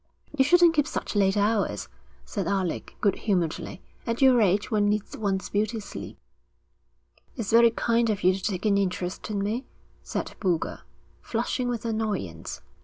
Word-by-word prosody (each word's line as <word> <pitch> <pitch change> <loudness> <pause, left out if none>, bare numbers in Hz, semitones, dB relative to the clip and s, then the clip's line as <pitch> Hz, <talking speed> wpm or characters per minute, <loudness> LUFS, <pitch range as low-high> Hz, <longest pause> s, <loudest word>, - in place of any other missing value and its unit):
'You 270 - +5
shouldn't 345 +3 +6
keep 295 -2 +2
such - - -4
late 195 0 +3
hours,' 205 +1 +1 0.4
said 195 -6 -3
Alec, 190 -3 -2
good 200 -3 +3
humouredly. 180 -3 -2 0.2
'At 230 0 -1
your 260 -3 +6
age 200 +3 +2
one 205 -1 +3
needs 210 0 -1
one's 195 -3 -2
beauty 215 +2 0
sleep.' 205 - -8 1.2
'It's 230 -6 -3
very 235 +1 +7
kind 230 0 +1
of 210 -2 -1
you 185 +1 +5
to 190 - -5
take 190 +1 -2
an 200 -2 +3
interest 185 0 -2
in 200 -2 -1
me,' 225 +6 -1 0.4
said - - -4
Boulger, 175 -5 -1 0.4
flushing 245 +2 -1
with 235 -2 -3
annoyance. 195 - -3
210 Hz, 160 wpm, -26 LUFS, 195-230 Hz, 1.2 s, very